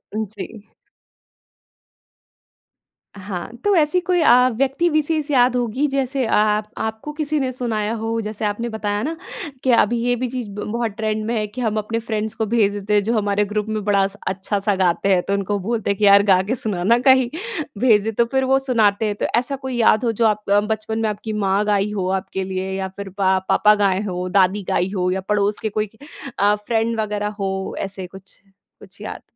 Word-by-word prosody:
उम, 220 Hz, -, 0 dB
जी। 210 Hz, +1 st, -9 dB, 2.5 s
हाँ 190 Hz, -3 st, -6 dB
तो 410 Hz, -1 st, +3 dB
ऐसी 320 Hz, +2 st, +3 dB
कोई 360 Hz, -1 st, +1 dB
अ, 250 Hz, -3 st, +6 dB
व्यक्ति 275 Hz, +7 st, +1 dB
विशेष 310 Hz, -1 st, 0 dB
याद 250 Hz, -2 st, +4 dB
होगी 245 Hz, +3 st, 0 dB
जैसे 270 Hz, -1 st, -1 dB
अ, -, -, -1 dB
अ, 210 Hz, 0 st, +3 dB, 0.2 s
आपको 220 Hz, +6 st, -4 dB
किसी 305 Hz, 0 st, -1 dB
ने 260 Hz, -2 st, -1 dB
सुनाया 225 Hz, -4 st, -2 dB
हो 225 Hz, 0 st, -1 dB
जैसे 215 Hz, 0 st, -4 dB
आपने 210 Hz, +3 st, -2 dB
बताया 210 Hz, -2 st, -2 dB
ना 320 Hz, +5 st, -2 dB, 0.5 s
कि 260 Hz, -, +3 dB
अभी 235 Hz, 0 st, +3 dB
ये 245 Hz, 0 st, +2 dB
भी 250 Hz, +1 st, -2 dB
चीज़ 250 Hz, -2 st, -4 dB
ब 205 Hz, +1 st, -6 dB
बहुत 235 Hz, -1 st, -1 dB
ट्रेंड 215 Hz, -1 st, -1 dB
में 235 Hz, +2 st, -1 dB
है 215 Hz, -, 0 dB
कि 235 Hz, +5 st, -7 dB
हम 220 Hz, -2 st, 0 dB
अपने 215 Hz, +2 st, -2 dB
फ्रेंड्स 220 Hz, -1 st, -3 dB
को 220 Hz, -, -1 dB
भेज 210 Hz, -2 st, +2 dB
देते 205 Hz, +1 st, -3 dB
हैं 205 Hz, -1 st, +4 dB
जो 225 Hz, +4 st, 0 dB
हमारे 205 Hz, 0 st, +1 dB
ग्रुप 210 Hz, +1 st, -2 dB
में 215 Hz, -1 st, -2 dB
बड़ा 200 Hz, -2 st, +3 dB
स 200 Hz, +1 st, -13 dB
अच्छा 195 Hz, +2 st, -2 dB
सा 200 Hz, 0 st, +1 dB
गाते 185 Hz, +1 st, +1 dB
हैं। 180 Hz, -, +3 dB
तो 200 Hz, -, 0 dB
उनको 200 Hz, +1 st, -1 dB
बोलते 220 Hz, +3 st, -2 dB
हैं 200 Hz, -, -2 dB
कि 210 Hz, -, +2 dB
यार 200 Hz, 0 st, +7 dB
गा 190 Hz, -2 st, +4 dB
के 245 Hz, -, 0 dB
सुनाना 215 Hz, -1 st, +1 dB
कहीं। 260 Hz, -2 st, +6 dB, 0.5 s
भेज 220 Hz, -4 st, +4 dB
दे 225 Hz, -, -1 dB
तो 235 Hz, +2 st, +2 dB
फ़िर 265 Hz, +3 st, 0 dB
वो 265 Hz, +1 st, +3 dB
सुनाते 225 Hz, -6 st, +2 dB
हैं। 210 Hz, -1 st, -1 dB
तो -, -, -2 dB
ऐसा 255 Hz, +3 st, -3 dB
कोई 265 Hz, -1 st, -5 dB
याद 225 Hz, 0 st, +4 dB
हो 230 Hz, -, +2 dB
जो 225 Hz, +1 st, 0 dB
आप 210 Hz, -1 st, -2 dB
अ, 200 Hz, +1 st, +5 dB
बचपन 220 Hz, +1 st, -3 dB
में 220 Hz, -1 st, +1 dB
आपकी 215 Hz, +1 st, -5 dB
माँ 200 Hz, -1 st, +1 dB
गाई 205 Hz, 0 st, +1 dB
हो 195 Hz, -3 st, -2 dB
आपके 190 Hz, 0 st, -5 dB
लिए 190 Hz, 0 st, -4 dB
या 190 Hz, 0 st, -2 dB
फ़िर 195 Hz, +1 st, -8 dB
पा 190 Hz, -1 st, +3 dB
पापा 210 Hz, 0 st, +5 dB
गाए 195 Hz, -2 st, +1 dB
हो, 180 Hz, -2 st, -3 dB
दादी 195 Hz, +2 st, +2 dB
गाई 180 Hz, -, +1 dB
हो 180 Hz, -1 st, 0 dB
या 190 Hz, +1 st, -1 dB
पड़ोस 205 Hz, 0 st, +1 dB
के 220 Hz, -, -2 dB
कोई 215 Hz, 0 st, -2 dB, 0.5 s
अ, 205 Hz, +1 st, +4 dB
फ्रेंड 225 Hz, +2 st, -1 dB
वग़ैरह 210 Hz, -1 st, -1 dB
हो 190 Hz, -1 st, -3 dB
ऐसे 195 Hz, -1 st, -5 dB
कुछ 190 Hz, +1 st, -14 dB, 0.4 s
कुछ -, -, -15 dB
याद? -, -, -6 dB
215 Hz, 215 wpm, -21 LUFS, 200-235 Hz, 2.5 s, यार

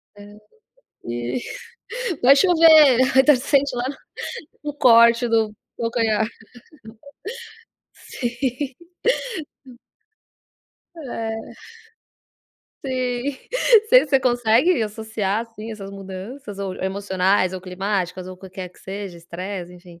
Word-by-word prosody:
É, 205 Hz, 0 st, -13 dB, 0.7 s
e. 120 Hz, -, -3 dB, 0.8 s
Vai 270 Hz, +3 st, +7 dB
chover, 315 Hz, -6 st, +6 dB, 0.2 s
então 270 Hz, +1 st, +7 dB
sente 275 Hz, 0 st, +1 dB
lá 245 Hz, +1 st, -2 dB, 0.8 s
um 295 Hz, -1 st, -4 dB
corte 235 Hz, -2 st, +5 dB
do 225 Hz, -2 st, +2 dB, 0.3 s
do 235 Hz, -, -5 dB
calcanhar. 220 Hz, -2 st, +1 dB, 1.7 s
Sim. 255 Hz, +2 st, -4 dB, 2.2 s
É, 240 Hz, -7 st, -5 dB, 1.6 s
sim. 255 Hz, +1 st, -2 dB, 0.5 s
você -, -, +6 dB
você 270 Hz, -2 st, +3 dB
consegue 245 Hz, +5 st, +3 dB
associar 215 Hz, -1 st, -2 dB
assim 225 Hz, -1 st, -10 dB
essas 200 Hz, -2 st, -8 dB
mudanças 195 Hz, +3 st, -8 dB
ou 195 Hz, -2 st, -4 dB
emocionais 190 Hz, -1 st, 0 dB
ou 185 Hz, -, -5 dB
climáticas 185 Hz, -1 st, -3 dB
ou 185 Hz, -, -8 dB
o -, -, -20 dB
qualquer 185 Hz, -1 st, -8 dB
que -, -, -23 dB
seja, 195 Hz, -2 st, -7 dB
estresse 180 Hz, +1 st, -7 dB
enfim. 175 Hz, -1 st, -15 dB
220 Hz, 100 wpm, -22 LUFS, 190-255 Hz, 2.2 s, Vai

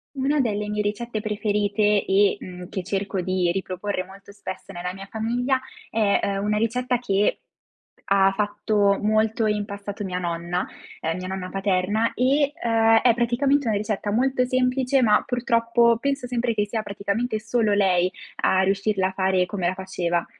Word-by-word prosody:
Una 275 Hz, +2 st, +1 dB
delle 210 Hz, -4 st, -1 dB
mie 210 Hz, 0 st, -1 dB
ricette 215 Hz, +2 st, -3 dB
preferite 210 Hz, -1 st, +1 dB
e, 200 Hz, +1 st, +3 dB
mhmm, 180 Hz, -1 st, -9 dB
che 190 Hz, -, -4 dB
cerco 195 Hz, +1 st, -2 dB
di 180 Hz, -1 st, 0 dB
riproporre 190 Hz, +1 st, -3 dB
molto 195 Hz, +2 st, -14 dB
spesso 195 Hz, -1 st, -8 dB
nella 180 Hz, 0 st, -4 dB
mia 195 Hz, +1 st, -9 dB
famiglia 240 Hz, +5 st, -1 dB, 0.3 s
è, 200 Hz, -2 st, +1 dB
uhm, 200 Hz, -, -2 dB
una 210 Hz, 0 st, +1 dB
ricetta 245 Hz, +3 st, 0 dB
che 205 Hz, -4 st, +1 dB, 0.7 s
ha 195 Hz, 0 st, +4 dB
fatto 205 Hz, -1 st, +1 dB
molto 215 Hz, +1 st, +1 dB
in 210 Hz, -1 st, 0 dB
passato 200 Hz, 0 st, -6 dB
mia 185 Hz, -2 st, -3 dB
nonna, 175 Hz, 0 st, -2 dB, 0.3 s
ehm, 165 Hz, +1 st, -2 dB
mia 185 Hz, 0 st, -5 dB
nonna 190 Hz, -1 st, -4 dB
paterna 195 Hz, +3 st, 0 dB
e, 280 Hz, +3 st, +2 dB
ehm, 225 Hz, -1 st, +4 dB
è 240 Hz, -2 st, +5 dB
praticamente 245 Hz, +3 st, +1 dB
una 215 Hz, -, +1 dB
ricetta 210 Hz, 0 st, -2 dB
molto 250 Hz, +3 st, +2 dB
semplice, 255 Hz, +1 st, +1 dB
ma 210 Hz, -4 st, +4 dB
purtroppo 235 Hz, -1 st, +2 dB
penso 275 Hz, 0 st, -2 dB
sempre 245 Hz, -1 st, -1 dB
che 210 Hz, -1 st, 0 dB
sia 220 Hz, +1 st, -2 dB
praticamente 205 Hz, +3 st, -2 dB
solo 220 Hz, 0 st, 0 dB
lei 185 Hz, -3 st, +3 dB, 0.3 s
a 190 Hz, -, +3 dB
riuscirla 195 Hz, 0 st, +1 dB
a -, -, -7 dB
fare 190 Hz, -1 st, +1 dB
come 180 Hz, -2 st, -2 dB
la 185 Hz, -, -1 dB
faceva. 180 Hz, -2 st, -2 dB
210 Hz, 165 wpm, -24 LUFS, 190-230 Hz, 0.7 s, è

